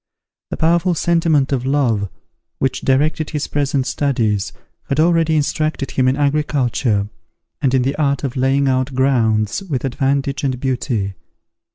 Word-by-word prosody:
The - - -4
powerful 170 +2 +2
sentiment 165 -5 +2
of 130 -3 0
love, 125 -8 +1 0.5
which 135 - -1
directed 150 +3 +1
his 150 -3 -2
present 140 -2 -1
studies, 120 -8 0 0.4
had 140 - 0
already 165 -1 +3
instructed 155 -1 -1
him 130 -1 +1
in 130 +2 +2
agriculture, 140 -7 0 0.5
and 135 - +2
in 130 - +2
the 135 +2 -1
art 140 -3 0
of 135 -2 -3
laying 135 +2 +2
out 130 0 0
grounds 115 - +1
with 150 -9 -3
advantage 135 +1 -1
and 130 -3 -1
beauty. 125 -6 -2
135 Hz, 145 wpm, -18 LUFS, 130-150 Hz, 0.5 s, already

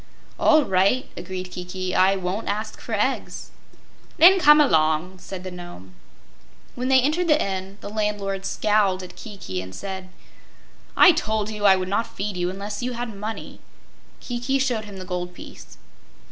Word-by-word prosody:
"All 310 -2 +5
right," 195 +8 +2
agreed 185 0 -6
Kiki; 180 +1 -5
"I 190 +1 +4
won't 190 +3 -3
ask 215 +1 -3
for 230 - -7
eggs." 215 +6 -2 0.7
"Then 375 +4 +8
come 300 -3 +7
along," 160 - +2
said 185 0 -8
the 185 - -6
Nome. 175 - -10 0.8
When 250 +1 -3
they 265 0 +5
entered 310 +7 0
the 300 -2 +4
inn, 190 0 -3
the - - -7
landlord 205 -2 -2
scowled 200 -3 +1
at 180 - -10
Kiki 190 - -6
and 95 0 -10
said: 190 -1 -6 0.9
"I 370 - +9
told 220 -9 -1
you 210 -1 -3
I 195 -1 +7
would 185 -1 -3
not 205 +4 0
feed 200 0 -3
you 175 0 -1
unless 200 +3 -5
you 250 +1 -2
had 235 -2 -5
money." 215 +3 -6 0.6
Kiki 245 +2 -2
showed 245 -5 -1
him 205 -2 -10
the 185 - -7
gold 180 -1 -4
piece. - - -12
200 Hz, 165 wpm, -23 LUFS, 185-235 Hz, 0.9 s, I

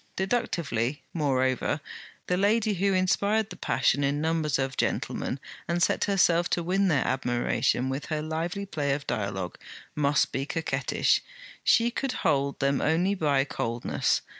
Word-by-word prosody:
Deductively, 170 - -1
moreover, 135 -2 +1 0.5
the 180 - 0
lady 210 +3 +2
who 195 +1 +1
inspired 200 +3 +1
the - - -6
passion 130 +4 +1
in 140 +1 +1
numbers 160 -2 0
of 135 0 -2
gentlemen 135 - -2 0.3
and 175 0 +1
set - - +2
herself 175 -4 +3
to 175 - 0
win 190 +3 +2
their 155 -6 +2
admiration 125 0 0
with 135 +2 -3
her 155 -1 -2
lively 170 +5 -3
play 145 -7 -1
of 140 0 -4
dialogue, 100 -5 -3 0.3
must 145 -1 +2
be 135 - -2
coquettish; 165 +1 +1 0.4
she 235 +1 +4
could 265 +1 -2
hold 140 -3 +1
them 140 0 +1
only 175 +6 +2
by 145 -7 +2
coldness. 120 -4 -1
155 Hz, 145 wpm, -27 LUFS, 135-185 Hz, 0.5 s, she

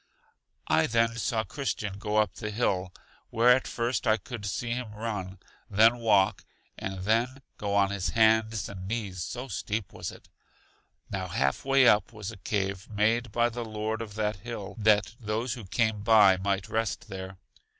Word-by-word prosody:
I - - +3
then 115 0 +2
saw 110 0 0
Christian 105 -7 -4
go 105 +1 -1
up 105 -1 +2
the 105 - -5
hill, 95 -4 0 0.4
where 115 +2 +3
at 130 - -2
first 120 +1 -1
I 110 0 +4
could 115 -4 -7
see 115 +5 -3
him 120 -2 -3
run, 105 -4 -4 0.3
then 110 +4 +5
walk, 105 -3 +3 0.3
and 95 -1 -5
then 120 +7 0 0.2
go 100 -1 -1
on 100 -1 +3
his 100 -2 -1
hands 110 -1 +3
and 95 -2 -8
knees, 100 -5 -3
so 125 +8 -5
steep 105 -2 -3
was - - -5
it. - - -15 0.8
Now 95 -1 -3
half 70 -5 0
way 135 -1 +5
up 105 -2 +4
was 110 -2 -6
a 110 - -11
cave 95 -1 -2
made 110 +2 +1
by 120 +2 +2
the 120 +1 -5
Lord 110 0 -3
of 105 -3 -7
that 105 -2 -1
hill, 105 -1 -7
that 105 -2 +3
those 110 +1 -2
who 115 -4 -8
came 110 +1 0
by 105 -3 +6
might 95 0 -1
rest 115 +1 -2
there. 95 -1 -7
110 Hz, 175 wpm, -28 LUFS, 100-115 Hz, 0.8 s, by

